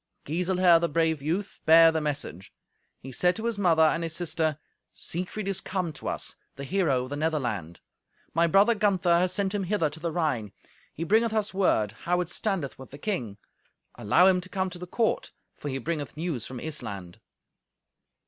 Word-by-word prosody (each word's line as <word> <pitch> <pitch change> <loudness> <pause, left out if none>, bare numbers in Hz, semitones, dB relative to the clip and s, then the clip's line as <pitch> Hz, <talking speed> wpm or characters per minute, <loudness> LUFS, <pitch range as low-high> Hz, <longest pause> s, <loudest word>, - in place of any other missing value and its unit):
Giselher, 180 +2 +3
the 170 0 0
brave 160 -1 +1
youth, 175 +7 -3
bare 165 +1 +8
the 160 -1 -1
message; 140 - -4 0.5
he 135 - -10
said 180 +8 +2
to 225 - -5
his 230 -3 -1
mother 165 -5 +4
and 160 +1 +3
his 165 -1 -3
sister, 160 -3 0 0.4
"Siegfried 185 +4 -3
is 195 -1 0
come 180 -4 -3
to - - -8
us, - - -2 0.2
the 140 - -7
hero 140 -6 +1
of 130 - -9
the - - -2
Netherland. 120 - -2 0.5
My 170 +1 +3
brother 200 +7 +5
Gunther 185 -5 +2
hath 180 +1 +2
sent 195 +1 0
him 200 -2 -1
hither 175 -6 0
to 155 - -9
the 170 0 -2
Rhine. 140 - -1 0.4
He 165 - -5
bringeth 220 +6 +2
us 215 -2 -1
word 145 - +2
how 175 - -1
it 175 - -4
standeth 185 -13 -2
with 130 - -10
the 140 - -10
king. 125 - -3 0.6
Allow 135 - +3
him 185 -1 +4
to 185 - -11
come 190 -1 -2
to 175 - -9
the 180 - -7
court, 225 +5 -1 0.2
for 145 - -6
he 135 - -2
bringeth 150 +1 -4
news 160 -8 -3
from 130 - -7
Issland." 100 - -6
165 Hz, 190 wpm, -27 LUFS, 145-185 Hz, 0.6 s, bare